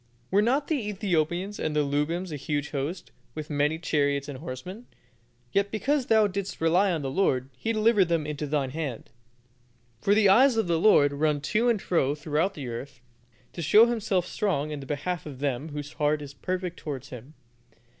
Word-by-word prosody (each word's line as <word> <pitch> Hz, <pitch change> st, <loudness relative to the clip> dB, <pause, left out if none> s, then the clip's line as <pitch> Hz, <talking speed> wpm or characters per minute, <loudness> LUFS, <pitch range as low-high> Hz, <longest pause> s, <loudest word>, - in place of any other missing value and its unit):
"Were 200 Hz, -, +4 dB
not 270 Hz, +6 st, +1 dB
the 265 Hz, -10 st, -1 dB
Ethiopians 185 Hz, 0 st, -1 dB
and 155 Hz, -1 st, -2 dB
the 150 Hz, -, +3 dB
Lubims 155 Hz, +6 st, -1 dB
a -, -, -3 dB
huge 145 Hz, 0 st, -3 dB
host, 150 Hz, +5 st, -4 dB, 0.2 s
with 155 Hz, -1 st, -6 dB
very 145 Hz, -, -3 dB
many 150 Hz, +2 st, +2 dB
chariots 145 Hz, -4 st, 0 dB
and 140 Hz, -3 st, -7 dB
horsemen? 175 Hz, -, -8 dB, 0.6 s
yet 200 Hz, 0 st, +1 dB
because 260 Hz, +5 st, 0 dB
thou 220 Hz, -1 st, +5 dB
didst 200 Hz, 0 st, -4 dB
rely 180 Hz, +5 st, +3 dB
on 160 Hz, -4 st, -2 dB
the 135 Hz, -, -3 dB
Lord 135 Hz, -6 st, +1 dB
He 220 Hz, -, -2 dB
delivered 215 Hz, -2 st, +4 dB
them 165 Hz, -3 st, 0 dB
into 150 Hz, 0 st, -4 dB
thine 140 Hz, -3 st, -1 dB
hand. 140 Hz, -7 st, -5 dB, 0.9 s
"For 200 Hz, +11 st, +2 dB
the 210 Hz, -1 st, +5 dB
eyes 245 Hz, +5 st, +5 dB
of 225 Hz, -, +2 dB
the 170 Hz, -2 st, +1 dB
Lord 145 Hz, -8 st, +5 dB
run 150 Hz, 0 st, +1 dB
to 220 Hz, +11 st, +1 dB
and 230 Hz, -3 st, +2 dB
fro 145 Hz, -7 st, +1 dB
throughout 155 Hz, +5 st, -1 dB
the 140 Hz, -4 st, -6 dB
earth, 125 Hz, +2 st, -7 dB, 0.5 s
to 170 Hz, -, -5 dB
show 210 Hz, +8 st, +7 dB
Himself 215 Hz, -6 st, 0 dB
strong 155 Hz, -8 st, -1 dB
in 150 Hz, -, -4 dB
the 135 Hz, -, -9 dB
behalf 155 Hz, +4 st, -3 dB
of 140 Hz, -3 st, -8 dB
them 140 Hz, +2 st, -2 dB
whose 145 Hz, 0 st, -6 dB
heart 150 Hz, 0 st, 0 dB
is 140 Hz, -1 st, -9 dB
perfect 180 Hz, +2 st, -4 dB
towards 135 Hz, -4 st, -6 dB
Him. 130 Hz, +5 st, -11 dB
160 Hz, 195 wpm, -27 LUFS, 145-200 Hz, 0.9 s, show